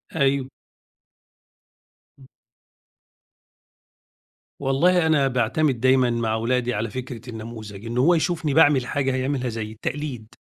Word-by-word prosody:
أيوه. 135 -3 +1 1.7
امم. 135 - -16 2.3
والله 160 +6 +2
أنا 150 -4 +3
باعتمد 130 +2 0
دايمًا 130 0 +3
مع 115 -2 -1
ولادي 125 +2 0
على 110 +1 -2
فكرة 125 0 -7
النموذج، 110 -2 -8
إن 115 +1 -4
هو 145 +8 +4
يشوفني 160 -2 -1
باعمل 145 -4 +5
حاجة 135 0 -1
هيعملها 130 -1 -1
زيّي، 110 -2 -5
التقليد. 125 0 -5
130 Hz, 110 wpm, -23 LUFS, 115-140 Hz, 2.3 s, باعمل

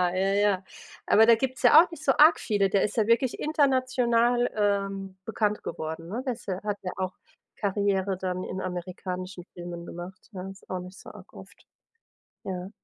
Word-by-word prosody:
Ja, 195 +1 +1
ja. 200 -2 +2 0.4
Aber 220 +1 +6
da 230 0 +7
gibt's 260 +1 -3
ja 300 +6 +9
auch 355 - -1
nicht 310 -2 -9
so 270 - +4
arg 310 +3 +7
viele, 200 -3 +1
der 195 0 +2
ist 210 - -2
ja 215 -1 +2
wirklich 235 +2 +2
international, 255 -5 +2
ähm, 195 -2 -1
bekannt 210 -2 -1
geworden, 160 +2 -5
ne? 240 +6 -4
Der 255 - 0
ist 235 - -14
ja 185 -1 -3
hat 205 -1 -2
ja 180 - -3
auch 185 0 -2 0.4
Karriere 200 -2 0
dann 185 -1 -3
in 190 +1 -5
amerikanischen 180 0 -5
Filmen 175 -1 -7
gemacht, 175 +5 -9
ja, 185 0 -6
ist 195 - -14
auch 185 - -2
nicht 180 +1 -10
so - - -11
arg - - -14
oft, - - -14 0.8
ja. 185 0 -5
200 Hz, 185 wpm, -27 LUFS, 185-235 Hz, 0.8 s, ja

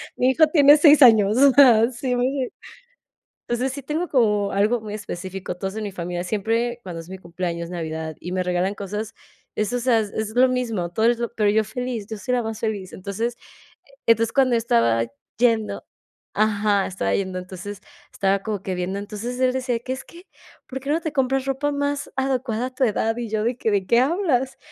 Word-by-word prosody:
mi 255 - +2
hijo 315 +5 +5
tiene 290 -1 +7
6 300 -1 +6
años, 220 -5 +6
o 275 +2 +6
sea, 245 -4 +6
sí, 250 +1 -2
me 245 - 0
hace 265 -2 -2 1.0
entonces, 250 +2 -1
sí 280 0 -7
tengo 310 +6 -2
como 210 -7 +1
algo 210 +5 +2
muy 215 -1 -8
específico. 190 -3 -6
Todos 190 +2 -5
en 220 - -4
mi 205 - -4
familia, 175 -1 -4
siempre 225 +5 -1
cuando 175 -3 -6
es 165 - -15
mi 190 - -7
cumpleaños, 170 -1 -5
navidad 160 -2 -5
y 180 - -6
me 185 0 0
regalan 180 +2 0
cosas, 205 +2 -5 0.4
es, 215 +2 -1
o 245 - 0
sea, 240 -2 +3
es 220 0 -3
lo 255 +1 +6
mismo, 230 -8 -2
todo 220 +5 0
es 235 0 +2
lo 235 - -3
pero 210 -2 +2
yo 215 +1 +2
feliz, 235 -1 -4
yo 220 - -5
soy 250 +5 -3
la 245 - +1
más 225 0 -5
feliz. 205 -4 -3
Entonces 210 +5 -3 0.7
e - - +7
entonces, 230 0 -1
cuando 265 -2 +3
yo - - +4
estaba 115 - +2 0.3
yendo 225 -2 +1 0.5
ajá, 205 -2 +2
estaba 140 - -2
yendo, 190 -1 -2
entonces, 185 +2 -8 0.3
estaba 195 0 +1
como 210 -2 -4
que 190 - -3
viendo, 180 +2 -3
entonces 220 +4 -6
él 255 -1 +2
decía 255 -2 -1
que 255 +2 -4
es 260 - -7
que: 345 +1 -14 0.4
"¿Por 265 -1 -5
qué 275 - -6
no 310 +3 +2
te 315 -2 -4
compras 270 -1 0
ropa 275 +2 -1
más 285 0 -2
adecuada 255 -3 -1
a 260 - -11
tu 270 - 0
edad?" 225 0 0
Y 235 -2 -4
yo 215 0 -1
de 240 +2 0
que: 225 - -1
"¿De 200 -2 +1
qué 235 - +4
hablas?" 270 -3 +1
225 Hz, 210 wpm, -23 LUFS, 195-255 Hz, 1.0 s, tiene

